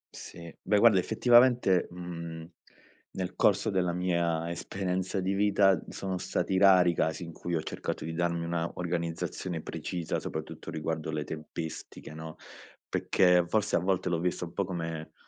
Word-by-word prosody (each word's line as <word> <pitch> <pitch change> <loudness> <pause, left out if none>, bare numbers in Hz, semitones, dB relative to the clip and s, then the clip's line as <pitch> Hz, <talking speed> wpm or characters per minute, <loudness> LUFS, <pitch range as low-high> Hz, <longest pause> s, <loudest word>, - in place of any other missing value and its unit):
Sì, 85 -1 -10
beh, 105 - +2
guarda, 105 -2 +6
effettivamente, 120 -1 +4
mhmm, 85 -2 -7 0.7
nel 90 -1 -4
corso 105 +2 +3
della 90 -3 +1
mia 85 -2 0
esperienza 95 +2 -2
di 95 +1 0
vita 100 -2 +3
sono 95 -2 -4
stati 95 - -1
rari 95 -3 +6
i - - -4
casi 80 +1 -1
in 85 - -7
cui 85 +2 -3
ho 80 - -1
cercato - - -4
di 80 - -4
darmi 85 0 -1
una 85 0 -1
organizzazione 85 0 -3
precisa. 85 +1 -3
Soprattutto - - -6
riguardo 80 0 -3
le 75 -1 -2
tempistiche, 80 0 -7
no? 80 0 -8 0.5
Perché 90 -1 +3
forse 105 +2 +1
a - - +4
volte 90 +1 0
l'ho 85 -2 0
vista 90 0 -1
un 85 - -11
po' 100 - 0
come 80 -3 -5
90 Hz, 155 wpm, -29 LUFS, 80-95 Hz, 0.7 s, guarda